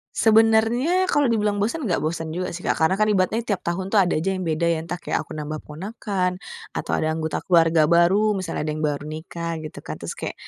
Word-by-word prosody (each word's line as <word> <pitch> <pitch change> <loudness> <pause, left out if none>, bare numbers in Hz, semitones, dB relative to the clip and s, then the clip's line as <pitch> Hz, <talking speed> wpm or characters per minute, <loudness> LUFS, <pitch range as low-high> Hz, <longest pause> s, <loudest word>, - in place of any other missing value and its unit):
Sebenernya 225 +10 +4
kalo 290 -7 +2
dibilang 210 -3 +1
bosen, 265 +8 -1
enggak 180 - 0
bosen 160 0 -3
juga 180 +2 -2
sih, 175 +1 -7
Kak, - - 0
karena 185 +4 +3
kan 215 - +3
ibaratnya 215 +5 +1
tiap 200 -3 -1
tahun 185 +3 -3
tuh 205 - +6
ada 180 -3 +1
aja 190 +5 0
yang 185 - -3
beda 165 -1 0
ya, 165 -1 +1
entah 170 +2 -5
kayak - - -2
aku - - -9
nambah 155 0 -5
ponakan 185 +2 -3 0.3
atau - - -4
ada 155 0 0
anggota 160 -1 -2
keluarga 165 -3 +4
baru, 180 +6 +4
misalnya 185 -5 -3
ada 155 - -1
yang 155 - -5
baru 150 -1 -1
nikah 165 +1 -5
gitu 155 - -8
kan. - - -7
Terus - - -6
kayak, - - -4
180 Hz, 225 wpm, -23 LUFS, 160-210 Hz, 0.3 s, tuh